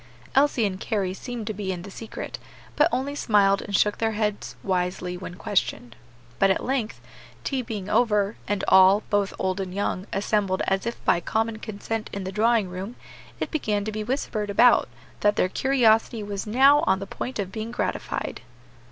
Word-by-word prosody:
Elsie 270 -4 +3
and 190 -2 -2
Carry 195 -4 -1
seemed 235 +2 -6
to 215 - -3
be 200 -2 -3
in 175 -2 -5
the 200 - -9
secret, 220 +3 -7 0.4
but 300 +3 +4
only 275 +2 -1
smiled 200 -7 +3
and 200 - -3
shook 210 +1 +2
their 225 -1 +1
heads 210 -1 -2
wisely 180 -1 -1
when 180 0 -7
questioned. 125 - -1 0.4
But 195 - +5
at 190 - +1
length 250 -4 -1 0.4
tea 270 -2 -1
being 210 -5 -5
over, 210 -2 +2
and 205 -1 -1
all, 190 +2 +6
both 205 -1 +2
old 190 0 -1
and 190 -1 -3
young, 200 -1 -2
assembled 200 -1 0
as 195 +3 0
if 235 - -5
by 175 - +4
common 220 +5 -1
consent 215 +1 -4
in 200 - -4
the 190 - -4
drawing 220 0 +2
room, 185 +6 -6 0.4
it - - -3
began 210 -10 -1
to 215 - -2
be 215 0 -3
whispered 215 -4 -2
about 240 +5 +5 0.3
that 205 0 +3
their 185 - +2
curiosity 230 -2 +2
was 205 0 -5
now 270 +6 +6
on 190 - +4
the 195 - -5
point 255 +5 -5
of 195 -3 -3
being 220 +2 -5
gratified. 240 - -3
210 Hz, 185 wpm, -25 LUFS, 195-225 Hz, 0.4 s, all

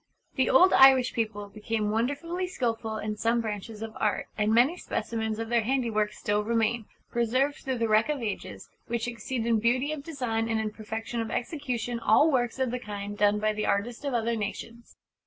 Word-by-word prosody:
The 260 - +1
old 365 +8 +6
Irish 265 -2 +7
people 215 -3 -2
became 215 0 -2
wonderfully 290 +11 -1
skilful 230 -10 -2
in 215 0 -4
some 230 +2 +1
branches 215 0 -5
of 225 -1 -7
Art; 210 - 0
and 210 0 +1
many 245 +9 +4
specimens 220 -9 -3
of 225 0 -4
their 235 -1 +3
handiwork 225 -3 0
still 210 0 -1
remain 225 0 0 0.3
preserved 255 +5 +1
through 260 -2 -3
the 230 -1 0
wreck 215 +4 +3
of 295 -2 0
ages 215 -5 -5 0.2
which 235 0 -2
exceed 235 0 -3
in 230 -2 +2
beauty 255 +6 +1
of 305 -2 -4
design 245 -7 -2
and 225 -1 +1
in 215 -1 -2
perfection 220 +2 -5
of 225 - -4
execution 245 -4 -3
all 290 +8 +4
works 245 -3 0
of 260 -2 0
the 250 - -2
kind 205 -2 -6
done 205 0 +3
by 215 0 +1
the 215 0 -2
artists 230 +6 -1
of 280 -3 -1
other 230 0 0
nations. 225 +3 -6
230 Hz, 195 wpm, -28 LUFS, 215-250 Hz, 0.3 s, Irish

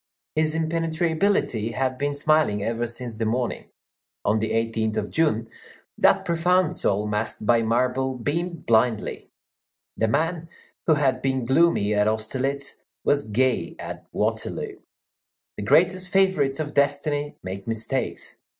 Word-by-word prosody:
His 155 0 +1
impenetrability 160 - 0
had 130 0 -1
been 145 0 -1
smiling 145 -8 +2
ever 115 +2 -1
since 120 0 -4
the 115 - -1
morning. 120 +2 -2 0.6
On 105 +2 +3
the 110 - -1
18th 115 -1 0
of 105 -1 -2
June, 115 -9 +1 0.5
that - - +3
profound 175 +1 +2
soul 105 +1 0
masked 105 0 -2
by 115 +1 +4
marble 125 +3 +1
beamed 170 +7 -3
blindly. 115 0 +1 0.7
The 110 - +1
man 165 +7 -1 0.4
who 160 - +5
had 140 -3 +1
been 130 -2 0
gloomy 130 -6 +3
at 105 0 +3
Austerlitz 130 +6 -2 0.3
was 145 -4 +2
gay 125 +4 0
at - - -8
Waterloo. - - -2 0.8
The 105 - -4
greatest 185 - +3
favorites 185 -8 +2
of 150 -1 -3
destiny 145 +1 0
make 95 +2 -6
mistakes. 115 -1 -3
130 Hz, 130 wpm, -24 LUFS, 110-155 Hz, 0.8 s, who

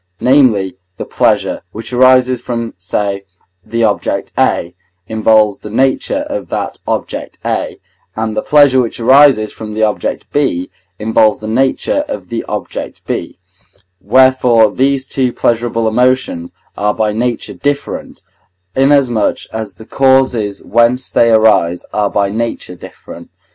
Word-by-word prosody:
Namely, 115 -8 +2 0.2
the - - -5
pleasure, - - 0
which 115 +3 -7
arises 130 0 +4
from, 115 -2 -4
say, 100 +2 -3 0.4
the 115 +3 -2
object 105 -3 -1
A, 85 - 0 0.3
involves 110 -1 +2
the 105 - -9
nature 130 +5 0
of - - -5
that - - -4
object - - -4
A, - - -2 0.4
and 110 -1 -3
the - - 0
pleasure, 140 -3 +4
which 120 -1 -4
arises 130 -3 +4
from 105 -1 -8
the 110 - 0
object 105 -1 -1
B, 110 -12 -1 0.3
involves 110 0 +2
the 110 - -7
nature 135 - 0
of - - -7
the 115 -1 -3
object - - -6
B; - - -4 0.6
wherefore 125 -1 +4
these 135 +2 0
two 130 -2 0
pleasurable 115 -1 0
emotions 125 -7 0 0.2
are 105 0 -1
by 110 -1 0
nature 120 +3 -2
different, 145 0 -4 0.5
inasmuch 135 -5 +2
as 110 -4 -5
the 110 - -13
causes 130 -6 +1
whence 120 +3 +1
they 115 - +3
arise 110 -6 +3
are 105 -1 0
by 100 0 0
nature 115 -3 -4
different. 90 - -12
115 Hz, 135 wpm, -14 LUFS, 105-130 Hz, 0.6 s, arises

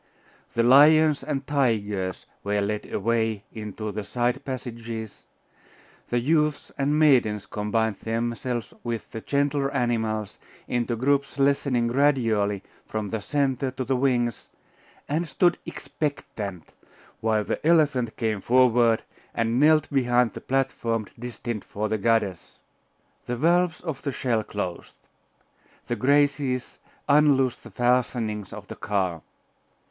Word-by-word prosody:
The 115 - +3
lions 150 +3 +6
and 135 -1 -3
tigers 105 -9 -1 0.2
were 105 0 0
led 105 +1 -2
away 110 -1 0
into 110 -1 -5
the 105 +1 -4
side 125 +5 -1
passages; 115 -4 -6 0.8
the 120 - +1
youths 150 +2 +1
and 145 +2 +1
maidens 125 -9 +3
combined 105 0 -1
themselves 120 +1 -3
with 120 -2 -4
the 115 - -6
gentler 140 +1 0
animals 110 -5 -1 0.3
into 120 -1 -1
groups 140 +4 0
lessening 140 -3 +2
gradually 115 -7 +2 0.2
from 110 -2 -3
the 110 0 -3
centre 135 +2 0
to 130 0 -5
the 130 +2 +1
wings, 125 -3 0 0.6
and 160 +3 -1
stood 175 -1 +2
expectant, 105 - -5 0.5
while 110 -1 +1
the - - -3
elephant 150 -8 +2
came 110 -3 -1
forward, 120 -2 +4 0.3
and 115 +1 +1
knelt 155 +1 +5
behind 125 -3 +2
the - - -8
platform 125 -4 -1
destined 120 -2 -5
for 105 +1 -3
the 110 0 -1
goddess. 105 -4 0 0.7
The 120 - -2
valves 170 +3 +2
of 160 -6 -5
the 140 - -2
shell 120 -4 0
closed. 95 -5 -5 0.9
The 120 - -2
Graces 140 -1 +1 0.3
unloosed 140 -4 +4
the - - -12
fastenings 120 -4 0
of - - -9
the - - -7
car. 95 -5 -1
120 Hz, 125 wpm, -25 LUFS, 110-140 Hz, 0.9 s, lions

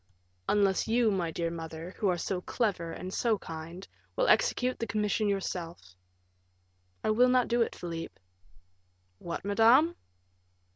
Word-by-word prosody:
"Unless 200 -2 +2
you, 230 0 +3
my 180 -4 -1
dear 165 +1 -2
mother, 165 +1 -7
who 205 - +1
are 180 - +1
so 180 +1 -2
clever 180 -7 -1
and 185 +2 -6
so 230 -3 +1
kind, 165 +2 -8 0.3
will - - +1
execute 255 - +2
the 230 - -2
commission 210 0 0
yourself." 175 - -4 1.1
"I - - +2
will 245 +4 +4
not 250 -1 +3
do 240 0 +1
it, 230 - 0
Philip." 165 -1 -6 1.0
"What, 170 +2 -5
madame?" 235 +11 +5
200 Hz, 140 wpm, -30 LUFS, 170-230 Hz, 1.1 s, madame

